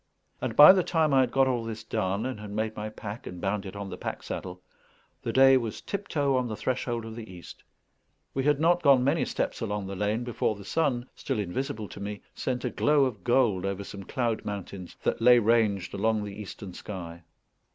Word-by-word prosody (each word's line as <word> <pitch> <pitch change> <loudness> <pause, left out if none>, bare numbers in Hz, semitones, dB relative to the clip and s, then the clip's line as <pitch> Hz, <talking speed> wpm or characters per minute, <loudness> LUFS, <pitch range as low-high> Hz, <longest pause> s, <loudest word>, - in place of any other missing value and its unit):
And - - -2
by 150 +5 +11
the 190 - +3
time 160 -4 +1
I 135 - +6
had 130 - +3
got 135 0 +3
all 125 -3 0
this 110 -1 -6
done, 100 +1 -1
and 130 -4 -4
had 105 -1 -8
made 110 +1 -2
my 105 0 -4
pack 105 +3 -8
and 90 - -7
bound 100 +2 -2
it 95 - -9
on 100 -1 -6
the - - -7
pack - - -5
saddle, 90 0 -6 0.6
the - - -2
day 135 0 +7
was 115 -4 -3
tiptoe 150 -9 -1
on 125 -1 +1
the 110 - -4
threshold 120 +1 -2
of 110 0 -8
the 110 -4 -8
east. 90 -2 -12 0.7
We 135 - -1
had 145 0 +3
not 175 +2 +3
gone 135 -4 +5
many 145 +5 +2
steps - - -2
along 105 -3 -2
the 95 0 -5
lane, 105 +4 -1
before 120 -2 -1
the 100 -1 -11
sun, 130 -6 0
still 135 - -3
invisible 105 +2 -3
to - - -10
me, 100 0 -5
sent 125 -1 -3
a - - -1
glow 145 -2 +3
of 110 -8 -4
gold 120 -6 +2
over 100 0 -2
some 100 0 -8
cloud 115 +2 -2
mountains 100 -3 -6
that - - 0
lay 125 +1 +7
ranged 110 -4 +2
along 110 +1 +1
the 100 -1 -6
eastern 100 -2 -8
sky. 85 -4 -7
110 Hz, 215 wpm, -28 LUFS, 100-130 Hz, 0.7 s, by